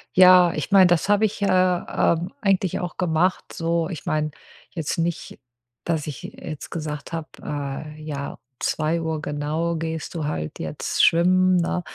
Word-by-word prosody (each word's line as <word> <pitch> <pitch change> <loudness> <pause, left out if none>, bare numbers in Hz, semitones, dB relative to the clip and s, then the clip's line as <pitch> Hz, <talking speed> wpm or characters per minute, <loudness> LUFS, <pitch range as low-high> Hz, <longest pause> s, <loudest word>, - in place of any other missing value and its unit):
Ja, 180 -1 +8
ich 155 - -4
meine, 190 -2 +7
das 175 0 +2
habe 205 +1 +3
ich, 210 -1 0
äh, - - +2
ähm, 180 -1 +1
eigentlich 195 -3 +1
auch 180 - -5
gemacht 180 +1 +1
so. 165 0 0
Ich 165 -7 -7
meine 155 0 0 0.4
jetzt 160 -2 -3
nicht, 170 0 -3 0.5
dass 160 -3 -1
ich 145 -5 -7
jetzt 155 -4 -8
gesagt 155 -1 -5
habe, 165 -1 -4
äh: 145 +1 -5
„Ja, 140 -2 -5 0.2
2 160 0 -1
genau 150 +3 -2
gehst 160 -1 -4
du 160 -3 -3
halt 75 - -4
jetzt - - -2
schwimmen”, 185 +2 +4
ne? 180 +1 0
165 Hz, 155 wpm, -23 LUFS, 155-180 Hz, 0.5 s, Ja